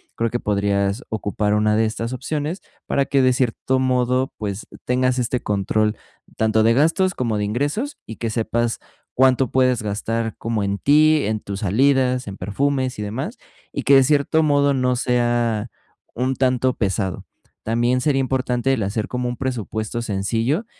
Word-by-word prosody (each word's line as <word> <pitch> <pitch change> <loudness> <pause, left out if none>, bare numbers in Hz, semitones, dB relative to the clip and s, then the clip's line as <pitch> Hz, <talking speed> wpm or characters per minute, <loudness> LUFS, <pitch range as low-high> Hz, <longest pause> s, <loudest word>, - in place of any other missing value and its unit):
creo 115 0 0
que 120 - -1
podrías 100 +2 0
ocupar 105 -1 -1
una 105 0 +2
de 110 +1 +3
estas 115 +2 -3
opciones 150 +6 -3 0.3
para 140 -1 +1
que 135 0 +2
de 130 -1 +4
cierto 125 +1 0
modo, 130 0 +1
pues, 100 -1 -5 0.2
tengas 130 0 +1
este 125 0 -1
control, 105 +2 0 0.4
tanto 110 0 +2
de 115 +1 +4
gastos, 165 +7 +2
como 115 -7 -1
de 105 - -1
ingresos, 145 - -2
y 110 - -7
que 115 - -2
sepas, 115 +1 -1 0.4
cuánto 130 -1 +3
puedes 130 -3 +2
gastar 110 +2 -2
como 115 -2 -2
en 100 0 -1
ti, 155 +1 +4
en 110 0 -1
tus 100 -1 -6
salidas, 125 +4 +2
en 100 - -6
perfumes 130 +6 -1
y - - -3
demás, 130 - -4 0.4
y - - -3
que, 140 - +5
de 135 - +7
cierto 150 +3 +2
modo, 145 -1 +3
no 125 -1 +1
sea 120 -2 0 0.5
un 130 +2 0
tanto 130 -1 +1
pesado, 95 -3 -2 0.4
también 120 +3 +1
sería 135 0 +2
importante, 130 0 0
el 110 - 0
hacer 105 +2 -2
como 125 -1 -2
un 120 - -5
presupuesto 115 -3 -3
sencillo, 115 - -1
120 Hz, 165 wpm, -21 LUFS, 110-130 Hz, 0.5 s, de